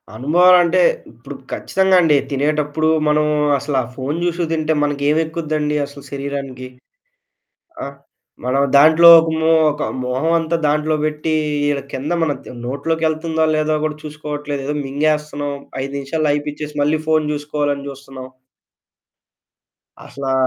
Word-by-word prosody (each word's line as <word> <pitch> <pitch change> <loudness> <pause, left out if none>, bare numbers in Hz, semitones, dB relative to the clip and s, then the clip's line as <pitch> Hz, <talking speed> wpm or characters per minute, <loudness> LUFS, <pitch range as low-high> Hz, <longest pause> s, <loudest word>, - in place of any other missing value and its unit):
అనుభవమంటే, 175 +7 +4 0.3
ఇప్పుడు - - -11 0.2
ఖచ్చితంగా 190 0 +1
అండి 155 -4 +4
తినేటప్పుడు 150 +2 0 0.2
మనం 150 0 +2 0.3
అసలా 140 -1 -1 0.2
ఫోను 140 +4 -3
చూసుకు 175 0 -1
తింటే 160 -1 0
మనకేమెక్కుద్దండి 150 +1 -1
అసలు 140 0 -13
శరీరానికి. 140 -2 -5 1.2
ఆ! - - -5 0.6
మనం 130 +2 +1
దాంట్లో 160 +4 +7
ఒక 165 0 +1
మొ 160 - +3 0.2
ఒక 150 - -6 0.2
మొహం 130 +6 -1
అంతా 165 +1 -1
దాంట్లో 150 +1 +1
పెట్టి, 155 +1 -1 0.4
ఇల 140 -1 -1
కింద 135 +3 -4
మన 160 -3 +1 0.3
నోట్లోకి 160 +5 -1
ఎళ్తుందో, 160 0 -1
లేదో 155 0 +1
కూడా 155 -1 -2
చూసుకోవట్లేదు. 150 -2 -5
ఏదో 150 - -2
మింగేస్తున్నాం, 145 0 -1 0.3
5 135 +1 -5
నిమిషాల్లో 150 +3 -2
అయిపిచ్చేసి 150 +1 -4
మళ్ళీ 150 +2 +1
ఫోను 155 -1 +1
చూసుకోవాలని 145 -1 -3
చూస్తున్నాం. 135 -1 -10 1.8
అసలా 135 -1 -4
150 Hz, 120 wpm, -18 LUFS, 140-155 Hz, 1.8 s, దాంట్లో